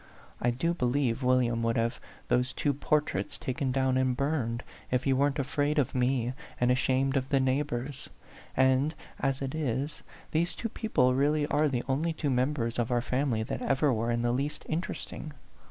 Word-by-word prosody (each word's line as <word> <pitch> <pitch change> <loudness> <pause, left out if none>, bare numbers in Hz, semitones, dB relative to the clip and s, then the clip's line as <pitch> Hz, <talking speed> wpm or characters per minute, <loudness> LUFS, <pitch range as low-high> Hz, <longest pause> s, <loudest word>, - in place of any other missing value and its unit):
I 120 - +3
do 135 +8 0
be 130 -8 0
lieve 125 -1 +1
William 125 -2 +2
would 115 0 +1
have 115 +2 0 0.3
those 125 +1 +1
two 145 - +1
por 150 +2 +2
traits 100 -8 -3
taken 130 +1 -2
down 130 0 +2
and 130 -1 +1
burned, 130 -5 -1 0.3
if 125 0 +1
he 135 - +3
weren't 140 +1 +2
afraid 145 +2 0
of 140 -5 +2
me 125 -1 +1 0.3
and 125 0 +3
ashamed 130 +1 +2
of 130 -1 0
the 140 - +3
neighbors. 135 0 -1 0.5
And 130 +4 +3 0.2
as 135 0 0
it 135 - -3
is, 145 -1 -2 0.3
these 170 +3 +1
two 230 - -3
people 170 - +2
really 145 +3 +2
are 150 +1 +2
the 125 -3 -1
only 155 +5 0
two 150 -3 -1
members 125 -2 0
of 120 +1 0
our 120 -1 +1
family 125 -4 0
that - - -4
ever 135 0 +2
were 115 +1 -1
in 120 0 0
the 120 - +2
least 140 +5 -2
interesting. 155 -2 -4
130 Hz, 185 wpm, -29 LUFS, 125-145 Hz, 0.5 s, I